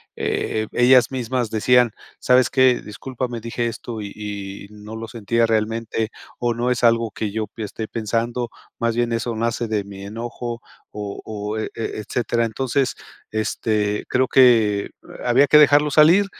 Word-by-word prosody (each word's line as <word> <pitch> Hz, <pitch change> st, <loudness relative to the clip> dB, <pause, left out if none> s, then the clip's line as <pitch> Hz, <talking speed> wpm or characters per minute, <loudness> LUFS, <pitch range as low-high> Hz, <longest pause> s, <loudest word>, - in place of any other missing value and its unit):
eh, 110 Hz, 0 st, -2 dB
ellas 125 Hz, -1 st, +5 dB
mismas 125 Hz, -2 st, -2 dB
decían: 120 Hz, +2 st, +3 dB, 0.3 s
"¿Sabes 125 Hz, 0 st, +4 dB
qué? 130 Hz, -2 st, +4 dB
discúlpame 120 Hz, +2 st, -5 dB
dije 115 Hz, +1 st, -3 dB
esto 115 Hz, 0 st, -6 dB
y 100 Hz, -1 st, -6 dB
y 100 Hz, -2 st, -6 dB
no 105 Hz, +1 st, -10 dB
lo 115 Hz, 0 st, -6 dB
sentía 115 Hz, +1 st, 0 dB
realmente, 110 Hz, 0 st, -1 dB, 0.3 s
o 120 Hz, -1 st, 0 dB
no 120 Hz, +2 st, -1 dB
es 125 Hz, -1 st, -1 dB
algo 115 Hz, -1 st, +4 dB
que 105 Hz, 0 st, -3 dB
yo 110 Hz, 0 st, -2 dB
esté 110 Hz, 0 st, -5 dB
pensando, 115 Hz, +2 st, -2 dB, 0.3 s
más 115 Hz, -1 st, 0 dB
bien 120 Hz, 0 st, 0 dB
eso 115 Hz, 0 st, -2 dB
nace 115 Hz, +1 st, -1 dB
de 110 Hz, -2 st, -1 dB
mi 100 Hz, -1 st, -10 dB
enojo" 120 Hz, +2 st, -5 dB, 0.3 s
o 105 Hz, -1 st, -6 dB
o, 105 Hz, 0 st, -4 dB
e 110 Hz, -, -3 dB
etcétera. 115 Hz, +1 st, -2 dB
Entonces, 130 Hz, +3 st, -1 dB, 0.4 s
este, 105 Hz, -1 st, -1 dB
eh, -, -, -18 dB
creo 130 Hz, 0 st, +2 dB
que 115 Hz, -6 st, +4 dB, 0.3 s
había 125 Hz, +4 st, +4 dB
que 150 Hz, -, +6 dB
dejarlo 150 Hz, 0 st, +6 dB
salir 160 Hz, +7 st, +6 dB
115 Hz, 155 wpm, -21 LUFS, 110-125 Hz, 0.4 s, que